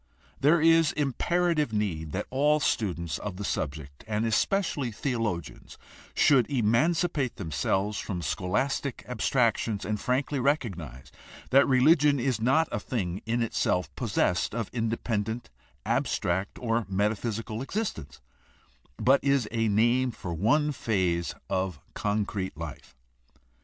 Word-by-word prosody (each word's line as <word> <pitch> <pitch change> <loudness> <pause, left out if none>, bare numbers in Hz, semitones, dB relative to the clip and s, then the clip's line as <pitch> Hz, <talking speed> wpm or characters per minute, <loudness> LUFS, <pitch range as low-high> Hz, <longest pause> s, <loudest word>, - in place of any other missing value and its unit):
There 150 +4 +4
is 165 0 +4
imperative 150 +1 +1
need 90 -8 -2
that 100 +2 -2
all 150 +3 +3
students 85 - -1
of 100 -3 -5
the 100 - -5
subject, 70 -5 -4
and 110 +1 0
especially 140 - 0
theologians, 110 - -3 0.4
should 130 -6 +4
emancipate 140 +4 +1
themselves 95 +6 -1
from 90 -4 -4
scholastic 130 - -1
abstractions 115 -4 0
and 105 -1 -2
frankly 135 +4 0
recognize 95 - -2 0.4
that 135 +2 +6
religion 145 +2 +4
is 125 -3 0
not 135 +7 +3
a - - -1
thing 100 -5 -3
in 115 +1 +1
itself, 90 -5 -1
possessed 100 -5 0
of 115 -4 -3
independent, 115 - -2 0.3
abstract, 95 +3 -1
or 115 -2 -1
metaphysical 110 +3 -1
existence, 140 - -4 0.8
but 135 +2 +3
is 140 -4 +2
a 115 -1 +1
name 120 +5 +3
for 90 -7 -6
one 145 - +2
phase 90 - -1
of 95 -5 -2
con 105 0 0
crete 95 -5 -4
life. 75 -5 -8
115 Hz, 120 wpm, -28 LUFS, 95-135 Hz, 0.8 s, that